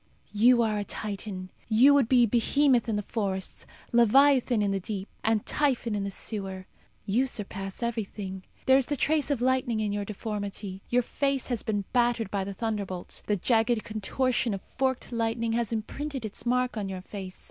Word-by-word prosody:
You 210 Hz, +3 st, +4 dB
you 250 Hz, -1 st, +6 dB
are 215 Hz, -2 st, 0 dB
a -, -, -1 dB
Titan. 200 Hz, -3 st, -5 dB, 0.2 s
You 240 Hz, +6 st, +6 dB
would 275 Hz, -5 st, +3 dB
be 245 Hz, -2 st, +6 dB
Behemoth 240 Hz, +2 st, +3 dB
in 220 Hz, -, +1 dB
the 205 Hz, -, -1 dB
forests, 195 Hz, -3 st, -3 dB, 0.2 s
Leviathan 245 Hz, 0 st, +5 dB
in 200 Hz, -, +1 dB
the 195 Hz, -, 0 dB
deep, 195 Hz, +1 st, -4 dB, 0.2 s
and 220 Hz, -1 st, +1 dB
Typhon 260 Hz, -6 st, +1 dB
in 205 Hz, -1 st, -1 dB
the 200 Hz, -, -2 dB
sewer. 195 Hz, -2 st, -4 dB, 0.4 s
You 240 Hz, +7 st, +2 dB
surpass 195 Hz, -2 st, -4 dB
everything. 205 Hz, -5 st, -4 dB, 0.2 s
There 265 Hz, +1 st, +6 dB
is 265 Hz, -, -1 dB
the 290 Hz, -, -1 dB
trace 305 Hz, +2 st, +1 dB
of 270 Hz, -4 st, 0 dB
lightning 255 Hz, -3 st, +1 dB
in 210 Hz, -1 st, 0 dB
your 205 Hz, 0 st, -2 dB
deformity; 200 Hz, -2 st, -5 dB
your 245 Hz, 0 st, +3 dB
face 275 Hz, +2 st, -1 dB
has 240 Hz, -4 st, -1 dB
been 205 Hz, -2 st, -2 dB
battered 240 Hz, -4 st, +2 dB
by 200 Hz, -2 st, 0 dB
the 195 Hz, -, -5 dB
thunderbolt. 200 Hz, -5 st, -4 dB
The 210 Hz, -, +2 dB
jagged 225 Hz, +3 st, +2 dB
contortion 230 Hz, +2 st, 0 dB
of 195 Hz, -, -8 dB
forked 260 Hz, -2 st, -2 dB
lightning 230 Hz, 0 st, -1 dB
has 235 Hz, -1 st, 0 dB
imprinted 265 Hz, +4 st, -4 dB
its 215 Hz, +3 st, -7 dB
mark 250 Hz, -1 st, +1 dB
on 200 Hz, -2 st, -2 dB
your 190 Hz, -1 st, -5 dB
face. 190 Hz, -1 st, -8 dB
225 Hz, 185 wpm, -28 LUFS, 200-245 Hz, 0.4 s, you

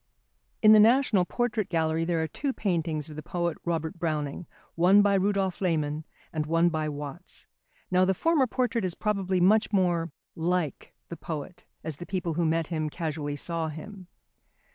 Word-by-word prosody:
In 215 Hz, 0 st, +9 dB
the 215 Hz, -, +8 dB
National 225 Hz, -4 st, +5 dB
Portrait 240 Hz, -1 st, -1 dB
Gallery 160 Hz, -1 st, +1 dB
there 165 Hz, -2 st, 0 dB
are -, -, -1 dB
two 270 Hz, -, -3 dB
paintings 165 Hz, -, -1 dB
of 155 Hz, -, -10 dB
the 155 Hz, -, -6 dB
poet 170 Hz, +1 st, -2 dB
Robert 165 Hz, -1 st, -2 dB
Browning, 155 Hz, -1 st, -2 dB, 0.3 s
one 190 Hz, +5 st, +5 dB
by 205 Hz, -1 st, +3 dB
Rudolph 195 Hz, -1 st, +1 dB
Lehmann 155 Hz, -4 st, 0 dB, 0.3 s
and 155 Hz, -2 st, -2 dB
one 165 Hz, +2 st, +3 dB
by 155 Hz, -2 st, -1 dB
Watts. 145 Hz, -1 st, -7 dB, 0.5 s
Now 185 Hz, 0 st, +4 dB
the 190 Hz, +1 st, +2 dB
former 310 Hz, -, +2 dB
portrait 240 Hz, -2 st, 0 dB
is 180 Hz, -2 st, -1 dB
probably 195 Hz, -3 st, 0 dB
much 210 Hz, +5 st, +4 dB
more 175 Hz, -5 st, +1 dB, 0.2 s
"like" 170 Hz, -2 st, -2 dB
the 170 Hz, -, -6 dB
poet 160 Hz, +2 st, -7 dB, 0.2 s
as 155 Hz, -3 st, -5 dB
the 175 Hz, -, -8 dB
people 180 Hz, -3 st, -2 dB
who 170 Hz, +2 st, 0 dB
met 165 Hz, +1 st, +1 dB
him 155 Hz, -1 st, -2 dB
casually 150 Hz, -3 st, -3 dB
saw 165 Hz, +2 st, -2 dB
him. 185 Hz, +5 st, -9 dB
170 Hz, 170 wpm, -27 LUFS, 160-195 Hz, 0.5 s, In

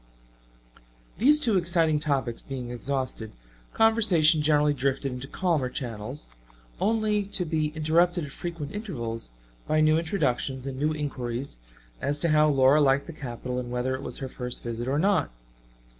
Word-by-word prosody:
These 290 Hz, +7 st, +5 dB
two 230 Hz, -9 st, +3 dB
exciting 165 Hz, -3 st, +2 dB
topics 135 Hz, -6 st, -1 dB
being 125 Hz, -3 st, -6 dB
exhausted, 130 Hz, -3 st, -3 dB, 0.4 s
conversation 190 Hz, -9 st, +4 dB
generally 150 Hz, -1 st, +3 dB
drifted 135 Hz, 0 st, -1 dB
into 125 Hz, +2 st, -6 dB
calmer 160 Hz, -6 st, 0 dB
channels, 105 Hz, -, -6 dB, 0.5 s
only 215 Hz, -1 st, +1 dB
to 195 Hz, -2 st, -2 dB
be 155 Hz, -1 st, 0 dB
interrupted 165 Hz, +2 st, +2 dB
at 140 Hz, -, -10 dB
frequent 165 Hz, -2 st, -6 dB
intervals 120 Hz, -, -5 dB, 0.4 s
by 155 Hz, -, +2 dB
new 155 Hz, +1 st, +4 dB
introductions 140 Hz, -6 st, -1 dB
and 135 Hz, -1 st, -5 dB
new 150 Hz, +2 st, +1 dB
inquiries 135 Hz, -, -4 dB, 0.4 s
as 145 Hz, +1 st, 0 dB
to 170 Hz, -, +2 dB
how 155 Hz, 0 st, +4 dB
Laura 135 Hz, +1 st, +5 dB
liked 140 Hz, 0 st, +3 dB
the 165 Hz, -, -8 dB
capital 125 Hz, -2 st, -5 dB
and 125 Hz, -1 st, -5 dB
whether 125 Hz, +1 st, -1 dB
it 130 Hz, -, -4 dB
was -, -, -5 dB
her 135 Hz, -, -5 dB
first 125 Hz, -1 st, -5 dB
visit 120 Hz, +1 st, -4 dB
or 135 Hz, +2 st, +1 dB
not. 195 Hz, +4 st, +2 dB
145 Hz, 155 wpm, -26 LUFS, 130-165 Hz, 0.5 s, These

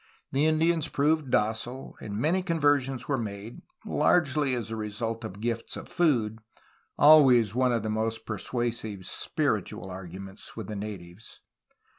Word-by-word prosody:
The 145 Hz, +3 st, +2 dB
Indians 160 Hz, 0 st, +2 dB
proved 150 Hz, 0 st, +1 dB
docile, 115 Hz, +4 st, -1 dB
and 100 Hz, -1 st, -5 dB
many 160 Hz, -, +2 dB
conversions 145 Hz, -7 st, +1 dB
were 140 Hz, -3 st, 0 dB
made, 105 Hz, 0 st, -6 dB, 0.2 s
largely 145 Hz, -5 st, +2 dB
as 115 Hz, -2 st, -4 dB
a -, -, -2 dB
result 110 Hz, +1 st, -4 dB
of 100 Hz, -2 st, -7 dB
gifts 115 Hz, +1 st, -2 dB
of -, -, -9 dB
food, 115 Hz, -10 st, +1 dB, 0.3 s
— -, -, -36 dB
always 130 Hz, -8 st, +7 dB
one 130 Hz, +1 st, +2 dB
of 115 Hz, -3 st, 0 dB
the 110 Hz, -, -2 dB
most 110 Hz, +1 st, -2 dB
persuasive 110 Hz, -1 st, -3 dB
^'spiritual 95 Hz, 0 st, -2 dB
arguments'' 95 Hz, +2 st, -9 dB
with 110 Hz, -2 st, -6 dB
the 105 Hz, -, -4 dB
natives. 100 Hz, -2 st, -8 dB
115 Hz, 145 wpm, -28 LUFS, 105-140 Hz, 0.3 s, always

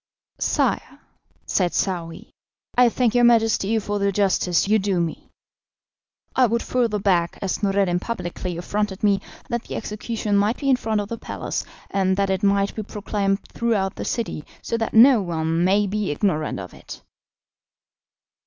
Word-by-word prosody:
"Sire," -, -, 0 dB, 0.5 s
said 180 Hz, -4 st, 0 dB
Saouy, 170 Hz, -4 st, -3 dB, 0.4 s
"I 245 Hz, -1 st, +6 dB
thank 235 Hz, -1 st, +1 dB
your 245 Hz, 0 st, +4 dB
Majesty 225 Hz, -2 st, +3 dB
for 205 Hz, -1 st, -2 dB
the 200 Hz, 0 st, +1 dB
justice 190 Hz, -3 st, +1 dB
you 215 Hz, +1 st, +4 dB
do 195 Hz, -2 st, 0 dB
me. 170 Hz, -2 st, -3 dB, 1.1 s
I 255 Hz, -1 st, +5 dB
would 235 Hz, +1 st, 0 dB
further 235 Hz, -4 st, 0 dB
beg, 180 Hz, -4 st, +1 dB
as 195 Hz, +1 st, -2 dB
Noureddin 195 Hz, -3 st, +1 dB
publicly 180 Hz, -4 st, -4 dB
affronted 200 Hz, +2 st, -2 dB
me, 200 Hz, -2 st, +3 dB, 0.3 s
that 235 Hz, -2 st, -2 dB
the -, -, -6 dB
execution 215 Hz, -1 st, -3 dB
might 205 Hz, +4 st, +2 dB
be 275 Hz, -2 st, +1 dB
in -, -, +6 dB
front 220 Hz, -3 st, -1 dB
of 205 Hz, -, -7 dB
the 230 Hz, -, -5 dB
palace, -, -, -4 dB, 0.3 s
and 190 Hz, -1 st, +1 dB
that 200 Hz, -1 st, +1 dB
it 190 Hz, -1 st, 0 dB
might 200 Hz, 0 st, +2 dB
be 220 Hz, -, -4 dB
proclaimed 205 Hz, -1 st, -2 dB
throughout 210 Hz, -5 st, 0 dB
the -, -, -6 dB
city, 225 Hz, -10 st, -3 dB, 0.2 s
so -, -, -2 dB
that 225 Hz, -1 st, -2 dB
no 240 Hz, 0 st, +8 dB
one 165 Hz, -2 st, -1 dB
may 200 Hz, +3 st, +3 dB
be 205 Hz, +1 st, -2 dB
ignorant 155 Hz, -, -1 dB
of 90 Hz, -2 st, -8 dB
it." -, -, -11 dB
200 Hz, 160 wpm, -23 LUFS, 185-225 Hz, 1.1 s, no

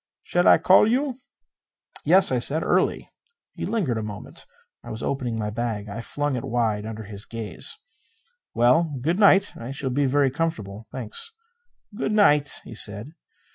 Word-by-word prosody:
"Shall 175 Hz, 0 st, +1 dB
I -, -, +8 dB
call 190 Hz, +3 st, +5 dB
you?" 270 Hz, +2 st, 0 dB, 0.9 s
"Yes," -, -, +6 dB
I -, -, +1 dB
said. -, -, +1 dB
"Early." -, -, +1 dB, 0.5 s
He -, -, -5 dB
lingered 160 Hz, -, -1 dB
a -, -, -3 dB
moment. 105 Hz, -1 st, -8 dB, 0.4 s
I -, -, -10 dB
was 110 Hz, -, -6 dB
opening 125 Hz, -4 st, -2 dB
my 105 Hz, -1 st, -3 dB
bag. 110 Hz, -2 st, -3 dB
I 110 Hz, +3 st, -5 dB
flung 145 Hz, +3 st, -2 dB
it 120 Hz, -, -4 dB
wide 110 Hz, -3 st, -1 dB
under 110 Hz, 0 st, -6 dB
his 100 Hz, -1 st, -6 dB
gaze. 115 Hz, -, -4 dB, 0.8 s
"Well, 140 Hz, +6 st, +3 dB
good 165 Hz, +9 st, -1 dB
night. 200 Hz, -1 st, +5 dB
I 115 Hz, +1 st, -8 dB
shall 135 Hz, -1 st, -4 dB
be 140 Hz, +2 st, +1 dB
very 140 Hz, 0 st, +2 dB
comfortable, 115 Hz, -, -4 dB
thanks." 125 Hz, -, -4 dB, 0.6 s
"Good 215 Hz, -1 st, -2 dB
night," 150 Hz, -9 st, +3 dB
he -, -, -10 dB
said. 105 Hz, +4 st, -1 dB
125 Hz, 165 wpm, -24 LUFS, 110-155 Hz, 0.9 s, I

